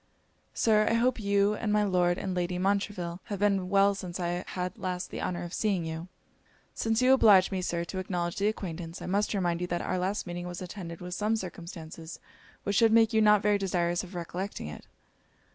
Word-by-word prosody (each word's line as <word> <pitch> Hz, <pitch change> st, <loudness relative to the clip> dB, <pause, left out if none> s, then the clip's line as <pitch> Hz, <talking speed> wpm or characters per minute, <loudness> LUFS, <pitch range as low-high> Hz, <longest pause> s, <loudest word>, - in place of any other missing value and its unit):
'Sir, 215 Hz, -1 st, +3 dB
I -, -, +2 dB
hope 245 Hz, +1 st, +2 dB
you, 200 Hz, 0 st, +2 dB
and 210 Hz, 0 st, -2 dB
my 210 Hz, 0 st, +3 dB
Lord 180 Hz, -3 st, +2 dB
and 190 Hz, -, -3 dB
Lady 180 Hz, 0 st, -1 dB
Montreville, 190 Hz, -2 st, -1 dB
have 205 Hz, -, -4 dB
been 195 Hz, -2 st, +1 dB
well 200 Hz, +1 st, +4 dB
since 185 Hz, -2 st, -6 dB
I 175 Hz, +1 st, -1 dB
had 180 Hz, 0 st, -4 dB
last 180 Hz, -1 st, -3 dB
the -, -, -5 dB
honour 175 Hz, -1 st, -2 dB
of 175 Hz, 0 st, -7 dB
seeing 195 Hz, -6 st, 0 dB
you?' 160 Hz, +2 st, -5 dB, 0.7 s
'Since 225 Hz, +2 st, 0 dB
you 260 Hz, +1 st, +6 dB
oblige 200 Hz, -7 st, +6 dB
me, 190 Hz, -1 st, -1 dB
Sir, 170 Hz, -1 st, -1 dB
to 185 Hz, +2 st, -5 dB
acknowledge 175 Hz, -2 st, -2 dB
the 200 Hz, -, +2 dB
acquaintance, 175 Hz, -5 st, -4 dB
I -, -, -7 dB
must 205 Hz, +3 st, 0 dB
remind 175 Hz, -3 st, 0 dB
you 180 Hz, -, -1 dB
that 175 Hz, -1 st, -2 dB
our 185 Hz, -, -1 dB
last 190 Hz, +3 st, -1 dB
meeting 175 Hz, 0 st, -5 dB
was 175 Hz, 0 st, -6 dB
attended 175 Hz, -2 st, -7 dB
with 180 Hz, 0 st, -6 dB
some 210 Hz, +4 st, +1 dB
circumstances 170 Hz, -4 st, -7 dB, 0.4 s
which 200 Hz, -, 0 dB
should 225 Hz, -2 st, +5 dB
make 225 Hz, 0 st, +5 dB
you 220 Hz, -, +4 dB
not 210 Hz, -1 st, +5 dB
very 205 Hz, -1 st, +3 dB
desirous 175 Hz, -2 st, 0 dB
of 185 Hz, 0 st, -10 dB
recollecting 175 Hz, -, -4 dB
it.' 75 Hz, -, -9 dB
185 Hz, 210 wpm, -29 LUFS, 175-205 Hz, 0.7 s, you